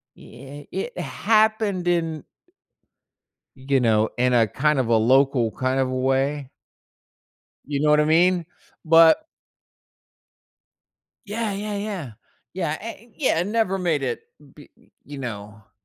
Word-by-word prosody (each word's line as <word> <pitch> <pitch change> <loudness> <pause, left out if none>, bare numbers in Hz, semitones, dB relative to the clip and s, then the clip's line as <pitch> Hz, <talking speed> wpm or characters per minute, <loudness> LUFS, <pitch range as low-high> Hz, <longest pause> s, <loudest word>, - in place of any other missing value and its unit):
yeah, 135 +4 -12
it - - -5
happened 215 -4 +1
in 165 -3 -1 1.3
you 135 +1 0
know, 110 -3 +2
in 125 0 +2
a 115 -3 +3
kind 150 +4 +1
of 120 - -1
a 115 - +4
local 125 0 +3
kind 130 +1 -1
of 130 -1 +1
a 130 - -3
way. 135 +2 -1 1.2
You 140 -1 -2
know 150 0 +2
what 150 0 +5
I - - +3
mean? 175 +2 +3 0.4
But 165 - +5 2.0
Yeah, 215 0 -3
yeah, 205 +1 -4
yeah. 195 - -5 0.4
Yeah, 170 -4 -3
a 225 +1 -8
it 235 - -25
yeah, 260 - +1
it 180 - -2
never 210 -3 0
made 165 -6 0
it 125 -3 -3 0.3
b 145 - -15 0.4
you 145 -1 -9
know, 105 -4 -7
i - - -38
150 Hz, 140 wpm, -23 LUFS, 130-185 Hz, 2.0 s, what